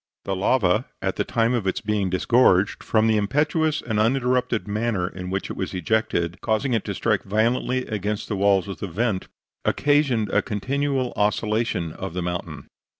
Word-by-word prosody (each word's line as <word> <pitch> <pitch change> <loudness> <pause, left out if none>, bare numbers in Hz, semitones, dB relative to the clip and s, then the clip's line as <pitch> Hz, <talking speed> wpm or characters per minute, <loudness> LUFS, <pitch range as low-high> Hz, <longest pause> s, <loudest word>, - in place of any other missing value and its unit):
The 95 - -1
lava, 105 +2 +2
at 95 0 -2
the - - +1
time 115 +1 +1
of 115 -6 -1
its 95 - 0
being 105 -2 -1
disgorged, 95 0 +3
from 110 -1 +2
the 110 -1 +3
impetuous 150 +8 +1
and 110 -3 -1
uninterrupted 125 -1 +1
manner 105 -3 -1
in 90 -1 -7
which 95 +1 -3
it - - -5
was 95 0 -4
ejected, 90 -2 -1
causing 120 +4 0
it 115 - +1
to 100 - -3
strike 105 -1 +1
violently 120 +5 0
against 105 -1 -3
the 105 - -2
walls 100 0 +3
of 100 - -6
the 100 - -4
vent, 95 +2 -1 0.4
occasioned 140 -7 +2
a 105 - +3
continual 130 +5 -1
oscillation 105 -4 0
of 80 - -7
the 90 - -2
mountain. 85 -3 -5
105 Hz, 175 wpm, -23 LUFS, 95-120 Hz, 0.4 s, disgorged